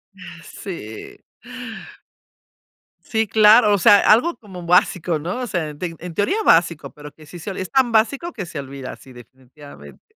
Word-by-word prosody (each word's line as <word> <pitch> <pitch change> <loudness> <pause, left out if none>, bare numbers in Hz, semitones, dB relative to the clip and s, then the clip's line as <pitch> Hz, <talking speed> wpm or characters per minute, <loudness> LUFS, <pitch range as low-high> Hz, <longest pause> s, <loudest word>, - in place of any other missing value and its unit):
Ah, 175 -3 -12
sí. 110 - -9 1.8
Sí, 220 +3 -2
claro. 215 +1 +5
O - - +3
sea, 200 +2 +6
algo 290 +11 +3
como 190 -6 -11
básico, 175 -2 +2
¿no? 180 +10 -4
O 250 - -4
sea, 170 -6 -3
en 150 - -12
te 170 -2 -5
en 175 0 -8
teoría 205 - 0
básico, 170 - +2
pero 150 0 -12
que 155 - -18
sí 175 +4 -11
se 195 - -6
es 185 - -5
tan 260 -3 +2
básico 260 +10 +1
que 195 -5 -6
se 160 -4 -7
olvida, 135 -1 -8
sí 130 - -17
definitivamente. 125 - -15
175 Hz, 170 wpm, -20 LUFS, 150-210 Hz, 1.8 s, sea